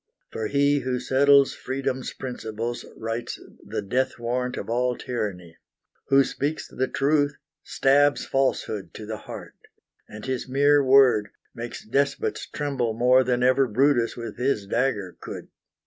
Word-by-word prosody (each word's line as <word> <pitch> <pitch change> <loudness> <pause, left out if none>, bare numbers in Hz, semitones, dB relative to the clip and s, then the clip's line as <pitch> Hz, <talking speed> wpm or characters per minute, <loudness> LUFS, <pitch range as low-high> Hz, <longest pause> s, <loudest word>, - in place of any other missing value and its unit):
For 110 -1 -3
he 140 +2 +2
who 130 -1 -2
settles 140 +1 +4
Freedom's 130 -1 -3
principles 120 -2 -5
Writes 115 +1 -4 0.2
the - - -4
death 130 +6 -1
warrant 125 +1 -2
of - - -5
all 125 +2 0
tyranny; 90 -9 -5 0.5
Who 135 0 +5
speaks 145 +3 -3
the 130 - -2
truth 145 0 +1 0.3
stabs 145 +1 +2
Falsehood 130 -6 -1
to 110 - -7
the 110 0 -5
heart, - - -9 0.6
And 105 0 -9
his 130 -1 -3
mere 145 +2 +4
word 130 -5 +5 0.3
makes 115 0 -7
despots 140 +5 -1
tremble 130 -6 -2
more 125 +2 +5
Than 125 -1 0
ever 130 +1 +4
Brutus 125 +1 +2
with 115 -1 -6
his 125 -5 0
dagger 105 -4 -1
could. - - -8
125 Hz, 140 wpm, -25 LUFS, 115-135 Hz, 0.6 s, Who